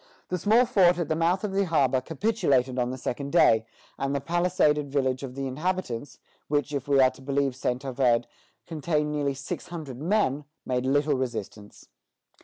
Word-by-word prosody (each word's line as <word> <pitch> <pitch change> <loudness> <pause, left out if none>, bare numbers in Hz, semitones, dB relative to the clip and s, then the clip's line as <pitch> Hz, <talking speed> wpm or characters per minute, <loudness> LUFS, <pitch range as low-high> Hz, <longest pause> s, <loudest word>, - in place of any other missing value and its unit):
The 180 - -1
small 225 +7 +4
fort 180 -6 +4
at 170 -3 -2
the 155 - +1
mouth 170 +4 +1
of 210 - -2
the 195 +1 +1
harbor 135 -6 +2
capitulated 140 - 0
on 125 0 0
the 130 - -4
second 140 +2 -4
day, 110 -10 +4 0.3
and 140 +1 -1
the - - +1
palisaded 165 -3 +1
village 130 -2 0
of 130 -2 -7
the 135 0 -3
inhabitants, 145 -2 -3 0.3
which, 145 0 -1
if 140 0 -3
we 140 -1 +3
are 130 -1 +6
to - - -16
believe 135 -1 0
Saint 125 0 -2
Ovide, 125 -3 +2 0.4
contained 150 -2 -1
nearly 145 -2 -1
six 135 0 -6
hundred 150 -7 -7
men, 155 -6 +1 0.2
made 125 0 -1
little 145 +2 +2
resistance. 115 -5 -5
140 Hz, 180 wpm, -26 LUFS, 130-165 Hz, 0.4 s, are